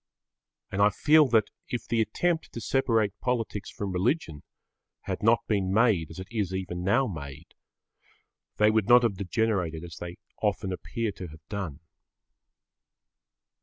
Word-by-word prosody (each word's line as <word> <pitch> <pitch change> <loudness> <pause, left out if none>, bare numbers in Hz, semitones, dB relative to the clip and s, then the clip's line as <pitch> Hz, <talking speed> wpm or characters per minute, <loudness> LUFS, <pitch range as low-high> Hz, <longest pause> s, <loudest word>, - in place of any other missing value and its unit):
And 100 - 0
I 105 - +7
feel 150 +8 +5
that, 110 -4 +2 0.2
if 120 - -4
the 115 -1 +2
attempt 160 +10 0
to - - -5
separate 115 -4 +1
politics 115 -5 -2
from 100 -2 -4
religion 90 - -1 0.6
had - - -4
not 115 +2 +3
been 100 -3 0
made 100 -7 +3
as 80 - -10
it 95 0 -7
is 100 -5 -1
even 90 -2 -4
now 115 +9 +3
made, 75 - -8 1.0
they 105 0 +5
would 110 -2 +1
not 120 0 +8
have 105 -5 +1
degenerated 95 -5 -1
as 85 -3 -9
they 85 0 -7 0.2
often 100 -2 0
appear 115 +4 -3
to 95 -2 -8
have 80 0 -15
done. 95 -10 -5
100 Hz, 150 wpm, -28 LUFS, 90-115 Hz, 1.0 s, not